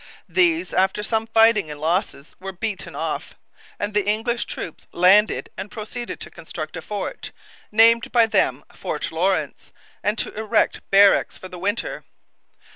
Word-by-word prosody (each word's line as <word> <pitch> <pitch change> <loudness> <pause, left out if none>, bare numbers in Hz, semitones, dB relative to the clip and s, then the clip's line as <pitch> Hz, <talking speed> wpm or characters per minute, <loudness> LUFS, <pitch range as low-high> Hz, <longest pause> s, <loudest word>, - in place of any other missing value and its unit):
These, 345 -1 +2
after 190 +2 +1
some 220 +1 -1
fighting 225 -5 +4
and 150 -1 -7
losses, 165 -2 -2
were 190 +1 -6
beaten 195 +1 -5
off; - - -4 0.4
and 205 +1 -3
the 205 -1 +1
English 225 +3 0
troops 165 - -7
landed 195 +4 +4
and 200 - -6
proceeded 235 +3 -6
to - - -8
construct - - -7
a - - -5
fort, - - -5 0.4
named 230 +2 +5
by 235 -2 +5
them 225 - +1
Fort - - -4
Lawrence, - - -1 0.3
and 210 +2 0
to - - -3
erect 220 0 0
barracks 200 0 +5
for 185 - -10
the 180 - -9
winter. 205 +5 -2
210 Hz, 150 wpm, -22 LUFS, 190-225 Hz, 0.4 s, named